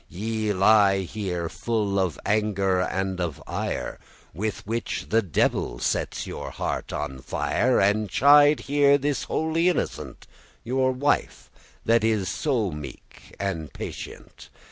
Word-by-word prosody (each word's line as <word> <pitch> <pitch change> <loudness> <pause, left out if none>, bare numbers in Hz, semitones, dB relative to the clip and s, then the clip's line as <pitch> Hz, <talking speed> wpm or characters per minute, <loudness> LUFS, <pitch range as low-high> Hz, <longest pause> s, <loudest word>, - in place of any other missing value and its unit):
<18> 90 +6 -8
Ye 110 -1 -1
lie 100 0 +5
here 90 -3 -3
full 105 +1 -1
of 90 -6 -1
anger 100 -3 +1
and 95 0 -1
of 85 -5 -3
ire, - - -4 0.3
With 105 +4 -4
which 115 +3 -3
the 115 +1 +3
devil 80 - 0
sets - - -2
your - - -6
heart - - -4
on 65 -3 -4
fire, 125 - +1
And 105 +1 +2
chide 145 - +6
here 140 0 +4
this 145 -1 -1
holy 160 +2 +1
innocent 180 - -3 0.4
Your 130 +2 +1
wife, 140 +3 -1 0.3
that 115 0 +3
is 110 -4 +1
so 120 - 0
meek 75 -2 -10
and 85 -7 -3
patient. - - -9
105 Hz, 135 wpm, -25 LUFS, 95-125 Hz, 0.4 s, chide